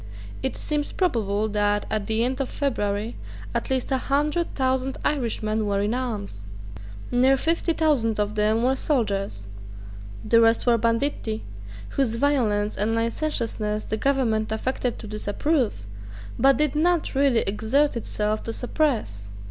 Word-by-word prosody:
It 265 - -2
seems 295 -1 -1
probable 220 - 0
that, 205 0 +1
at 215 -2 -1
the 220 +1 +1
end 260 +3 -1
of 265 - -2
February, 220 -5 -2 0.4
at - - -2
least 260 0 -1
a 265 - +2
hundred 300 +6 0
thousand 260 0 0
Irishmen 220 -6 0
were 200 -1 +1
in 205 +3 0
arms. 210 - -4 0.7
Near 260 +2 +4
fifty 335 +4 +1
thousand 275 -10 +1
of 210 0 0
them 215 +2 +2
were 260 +2 +3
soldiers. 200 - -1 0.8
The 230 - +5
rest 225 0 +3
were 235 -2 +4
banditti, 230 -1 -1 0.5
whose 255 -5 0
violence 230 -6 +1
and 215 +3 0
licentiousness 230 -3 -1
the 220 - -2
Government 225 -5 +1
affected 245 +2 -2
to - - -9
disapprove, 215 - -1 0.5
but 275 0 +5
did 300 -1 +1
not 340 +1 +1
really 270 -4 +3
exert 230 +9 +1
itself 215 -2 -2
to 225 - -3
suppress. 230 - -1
230 Hz, 140 wpm, -24 LUFS, 215-275 Hz, 0.8 s, The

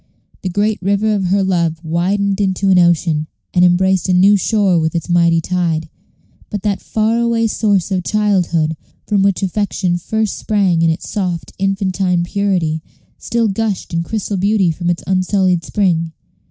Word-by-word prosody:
The 185 - -3
great 205 +3 0
river 200 +3 +1
of 200 -2 -1
her 195 +2 +1
love 170 -3 -1
widened 195 +5 0
into 195 0 +1
an 185 - +5
ocean, 165 -3 +2 0.3
and 180 - +3
embraced 185 0 +2
a - - +3
new 195 +3 +5
shore 200 -3 +2
with 160 +1 -1
its 165 -1 -3
mighty 170 -1 +3
tide; 165 -2 -1 0.6
but 205 -3 -5
that 205 -2 -1
far 220 +1 0
away 235 -1 +1
source 205 -4 0
of 185 -2 0
childhood, 180 -7 +1 0.3
from 205 -2 +1
which 195 0 +1
affection 190 -2 -1
first 220 +4 -2
sprang 195 -6 +1
in 165 - +3
its 160 +2 -3
soft 180 -8 -3
infantine 190 -2 0
purity, 175 -4 -1 0.4
still 235 -1 0
gushed 205 -3 -2
in 165 - 0
crystal 205 +2 -3
beauty 195 -2 +2
from 175 +2 -3
its 175 - -1
unsullied 185 -1 +1
spring. 165 -5 0
190 Hz, 165 wpm, -17 LUFS, 170-205 Hz, 0.6 s, an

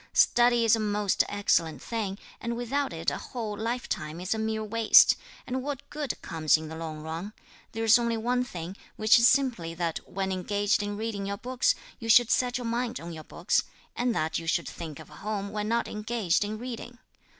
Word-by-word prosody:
"Study 240 -1 +4
is 225 - +6
a - - -3
most 210 -2 +1
excellent 165 -7 +1
thing, 205 - -3 0.2
and 235 0 -3
without 270 +4 -1
it 165 0 -1
a - - -4
whole 225 -4 -5
lifetime 215 -8 -3
is 180 +3 -1
a 220 - -3
mere 220 0 -1
waste, 225 +1 +6 0.3
and 260 +1 -2
what 285 0 -5
good 295 -3 -3
comes 155 -1 +2
in 155 0 -7
the 160 - -7
long 160 -1 -6
run? 165 +6 -5 0.4
There's 225 +1 +5
only 235 -1 0
one 245 +3 +1
thing, 180 -6 -7 0.2
which 215 +3 +5
is 235 - +7
simply 235 -13 +1
that 170 -1 -2
when 190 0 -2
engaged 205 +3 +1
in 205 0 -3
reading 210 -3 -3
your 200 0 -3
books, 250 +3 +1 0.2
you 225 -2 -6
should 240 +1 +6
set 245 -1 +2
your 245 - -5
mind 235 +1 -1
on 170 +1 -7
your 155 -1 -8
books; 175 +5 0 0.3
and 240 -1 0
that 155 +1 0
you 165 - -8
should 170 +1 +1
think 160 -4 -7
of - - -12
home 200 +5 -4
when 210 0 -2
not 235 +1 +1
engaged 210 -4 0
in 210 +1 -4
reading. 240 0 -7
215 Hz, 200 wpm, -28 LUFS, 175-235 Hz, 0.4 s, is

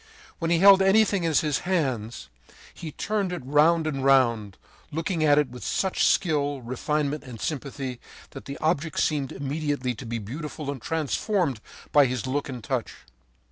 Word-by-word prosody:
When 165 -2 -1
he 170 - +3
held 195 +2 +7
anything 200 -1 +3
in 165 - 0
his 150 0 +2
hands, 130 - -2 0.5
he 160 - -8
turned 200 +2 -2
it 175 -6 -5
round 155 +4 +3
and 140 -4 -2
round, 120 -7 +3 0.3
looking 165 +2 -1
at 145 -1 +5
it 150 -3 +2
with 125 - -9
such 190 -1 0
skill, 145 -6 +1
refinement, 145 +4 -2
and 125 -5 -10
sympathy 135 -3 -4 0.3
that - - -10
the 140 +1 -6
object 160 -1 -1
seemed 145 -4 0
immediately 145 -2 -2
to 120 +3 -10
be 115 +1 -3
beautiful 140 +6 -6
and 135 -4 -7
transformed 160 - -1 0.3
by 145 -2 +6
his 125 -1 -3
look 140 +3 -2
and 125 -4 -7
touch. 125 -1 -2
145 Hz, 165 wpm, -25 LUFS, 130-165 Hz, 0.5 s, held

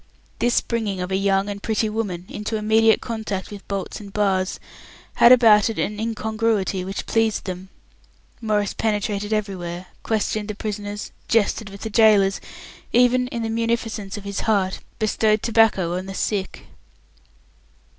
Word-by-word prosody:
This 240 0 +2
bringing 220 -5 -2
of 180 +1 -4
a - - +1
young 195 0 +1
and 200 -1 -5
pretty 220 0 0
woman 205 -5 -3
into 210 +2 -4
immediate 220 +1 +3
contact 215 -5 -4
with 205 -1 -10
bolts 195 -1 -4
and 200 -2 -10
bars 195 -2 0 0.6
had 235 - +8
about 225 -4 +7
it 225 - -4
an 210 0 -2
incongruity 220 -3 -1
which 195 +2 -5
pleased 225 -1 +1
them. 185 0 -6 0.7
Maurice 210 -3 0
penetrated 210 -1 -1
everywhere, 185 -4 -3 0.2
questioned 215 -1 -1
the 210 - -4
prisoners, 205 -1 -5 0.2
jested 220 -1 +1
with 200 0 -11
the 220 - -5
gaolers, 205 -3 +4 0.5
even, 250 +1 +4
in 235 -3 -4
the 225 - -2
munificence 225 -3 -2
of 205 - -8
his 200 -1 -4
heart, 195 -4 +1 0.2
bestowed 215 -1 +1
tobacco 215 -7 +3
on 185 +1 -4
the 195 - -6
sick. 195 -2 -2
210 Hz, 150 wpm, -22 LUFS, 195-225 Hz, 0.7 s, had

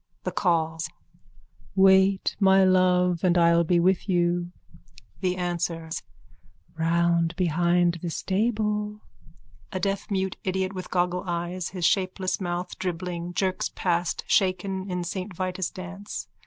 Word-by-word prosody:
_ - - -52
THE - - -2
CALLS: 165 -2 0 0.9
Wait, 190 0 +4
my 195 -1 +5
love, 180 -1 +3
and 180 -1 +3
I'll 170 0 +5
be 175 +1 +2
with 185 +3 +2
you. 175 -1 +1 0.7
THE 185 -1 -1
ANSWERS: 170 -2 -2 0.7
Round 170 0 +1
behind 175 0 +2
the 175 - -3
stable. 210 +2 -1 0.7
_(A 190 - -3
deafmute 195 -1 -1
idiot 190 0 -1
with 185 -1 -6
goggle 180 0 0
eyes, 175 +1 -3
his 180 -2 -3
shapeless 185 +1 0
mouth 175 0 -4
dribbling, 175 -1 -4
jerks 190 -1 0
past, 175 -1 0
shaken 190 0 0
in 180 -1 -2
Saint 185 +2 -5
Vitus' 185 0 -2
dance. 190 +3 -7
180 Hz, 125 wpm, -26 LUFS, 175-190 Hz, 0.9 s, my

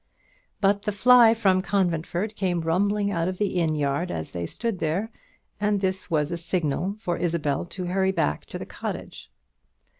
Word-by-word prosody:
But 200 0 +3
the 210 - -1
fly 230 +2 +6
from 190 -5 +3
Conventford 185 +1 -1
came 180 -4 0
rumbling 200 +5 +1
out 170 -2 0
of 185 0 -3
the 200 -2 -1
inn 160 -2 +1
yard 145 +4 0
as 80 - -4
they 85 -1 -4
stood 230 - -3
there, 185 +9 -1 0.5
and 205 -1 +1
this 190 -1 -2
was 150 -2 +1
a 170 - -2
signal 170 +2 -1
for 175 -6 -2
Isabel 165 -4 -1
to 180 +1 -6
hurry 190 +1 +1
back 120 - -1
to - - -6
the - - -6
cottage. 60 - -7
185 Hz, 175 wpm, -25 LUFS, 165-200 Hz, 0.5 s, fly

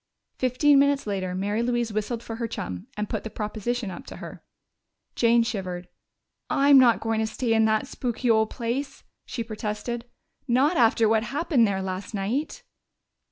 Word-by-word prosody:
Fifteen 275 +3 +4
minutes 280 0 +2
later 190 -3 -2
Mary 205 +4 -1
Louise 240 -2 0
whistled 220 +2 -2
for 225 -1 -6
her 230 -1 -2
chum 90 - -6
and 210 0 -2
put - - -3
the 220 - -5
proposition 215 +1 -3
up 175 - -9
to - - -8
her. - - -10 0.7
Jane 235 0 +4
shivered. 185 -6 -4 0.6
"I'm 280 0 +6
not 240 -3 +5
going 225 0 0
to 220 - +1
stay 230 +1 -1
in 220 0 +4
that 220 0 +2
spooky 245 0 -3
old 220 -1 +4
place!" 260 +4 -4 0.2
she 245 -2 -3
protested. 225 +2 -4 0.4
"Not 270 +7 +3
after 225 -3 +4
what 220 0 +3
happened 275 -1 +2
there 190 -1 -1
last 190 +3 -5
night." 255 - -2
230 Hz, 165 wpm, -25 LUFS, 210-245 Hz, 0.7 s, I'm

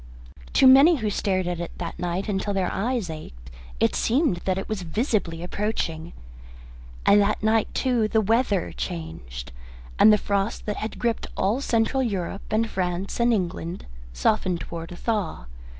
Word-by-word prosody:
To - - +5
many 275 +6 +8
who 220 -7 -2
stared 190 -2 0
at 175 -1 -2
it 170 - -6
that 170 0 -6
night 180 +3 -2
until 200 0 -1
their 185 -2 0
eyes 230 0 -1
ached 65 - -9 0.3
it - - +2
seemed 255 - +2
that 185 -1 +1
it 195 - -4
was 215 -3 -3
visibly 180 - -1
approaching. 175 -4 -3 0.9
And 205 +1 +6
that 205 +1 0
night, 220 0 +2
too, 245 -4 +2
the 220 - +2
weather 220 -2 +1
changed, 65 - -6 0.5
and 215 - +8
the 210 - +6
frost 200 +1 -1
that 210 - -2
had 220 - -4
gripped 235 -2 -1
all 215 +8 +1
Central 235 +1 +1
Europe 195 -5 -2
and 225 +1 +2
France 185 0 -3
and 235 0 +4
England 180 -4 -2 0.3
softened 170 - 0
towards 165 0 -7
a - - -7
thaw. 205 - -2
195 Hz, 165 wpm, -25 LUFS, 175-225 Hz, 0.9 s, many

